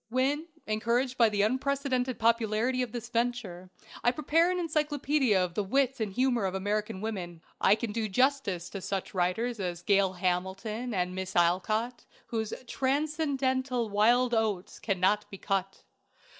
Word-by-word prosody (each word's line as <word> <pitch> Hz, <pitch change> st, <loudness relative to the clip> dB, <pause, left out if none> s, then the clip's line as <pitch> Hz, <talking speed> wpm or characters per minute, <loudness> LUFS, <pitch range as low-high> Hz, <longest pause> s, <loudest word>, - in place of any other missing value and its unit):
When, 275 Hz, +6 st, 0 dB, 0.2 s
encouraged 235 Hz, +4 st, 0 dB
by 230 Hz, -3 st, +5 dB
the 205 Hz, -1 st, +1 dB
unprecedented 260 Hz, +1 st, 0 dB
popularity 230 Hz, +2 st, +1 dB
of 245 Hz, -3 st, -2 dB
this 235 Hz, -1 st, -5 dB
venture, 230 Hz, -7 st, -2 dB, 0.3 s
I 240 Hz, -, +5 dB
prepare 310 Hz, +5 st, +2 dB
an 365 Hz, -, 0 dB
encyclopædia 295 Hz, -, +1 dB
of 180 Hz, -2 st, 0 dB
the 205 Hz, -, -1 dB
"Wit 265 Hz, +5 st, +1 dB
and 215 Hz, -3 st, -1 dB
Humor 245 Hz, 0 st, +1 dB
of 190 Hz, 0 st, -2 dB
American 205 Hz, 0 st, -2 dB
Women," 180 Hz, -7 st, -5 dB, 0.2 s
I 200 Hz, -, +6 dB
can 225 Hz, 0 st, -4 dB
do 220 Hz, 0 st, -2 dB
justice 205 Hz, -6 st, +1 dB
to 195 Hz, -, -5 dB
such 195 Hz, 0 st, -3 dB
writers 200 Hz, +6 st, 0 dB
as 175 Hz, -2 st, -3 dB
"Gail 195 Hz, -2 st, +3 dB
Hamilton" 190 Hz, +6 st, -2 dB
and 180 Hz, 0 st, 0 dB
Miss 190 Hz, 0 st, -5 dB
Alcott, 215 Hz, +8 st, +1 dB, 0.2 s
whose 220 Hz, -2 st, -3 dB
"Transcendental 265 Hz, -3 st, 0 dB
Wild 240 Hz, +4 st, +3 dB
Oats" 215 Hz, -5 st, -1 dB
cannot 200 Hz, 0 st, +1 dB
be 195 Hz, -, -8 dB
cut. 195 Hz, -1 st, -2 dB
225 Hz, 150 wpm, -29 LUFS, 195-255 Hz, 0.3 s, I